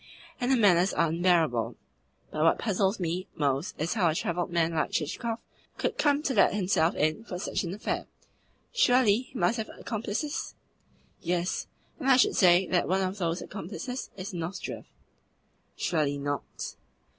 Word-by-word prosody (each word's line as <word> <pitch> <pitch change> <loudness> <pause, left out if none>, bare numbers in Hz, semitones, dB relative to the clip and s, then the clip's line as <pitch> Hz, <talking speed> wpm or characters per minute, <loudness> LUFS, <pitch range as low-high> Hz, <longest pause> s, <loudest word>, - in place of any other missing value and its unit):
And 245 - 0
her 265 - +5
manners 190 -4 +4
are 165 - +2
unbearable. 165 -8 +2 0.6
But 155 - -2
what 165 - +4
puzzles 200 -1 0
me 175 +1 -2
most 140 +1 -1
is 155 +3 0
how 190 -8 +3
a 155 - 0
travelled 175 +2 -1
man 170 -1 +1
like 155 - 0
Chichikov 225 +9 -2 0.4
could - - -2
come 290 0 +3
to 270 - 0
let 205 -3 +4
himself 180 -4 +2
in 155 +8 0
for 185 -6 -6
such 180 - -2
an 175 - -3
affair. 210 - -3 0.7
Surely 250 - +4
he - - -7
must 235 +1 +2
have 220 - -4
accomplices?" 230 +6 -3 0.7
"Yes; 175 +1 -1 0.3
and 270 -3 0
I 260 - +7
should 255 - +4
say 180 -1 +5
that 180 - +2
one 190 +2 +2
of 190 +2 -3
those 170 -1 -1
accomplices 215 - -6
is 185 0 -6
Nozdrev." 175 +2 -5 0.9
"Surely 150 -5 0
not?" 145 0 -4
185 Hz, 160 wpm, -28 LUFS, 165-220 Hz, 0.9 s, I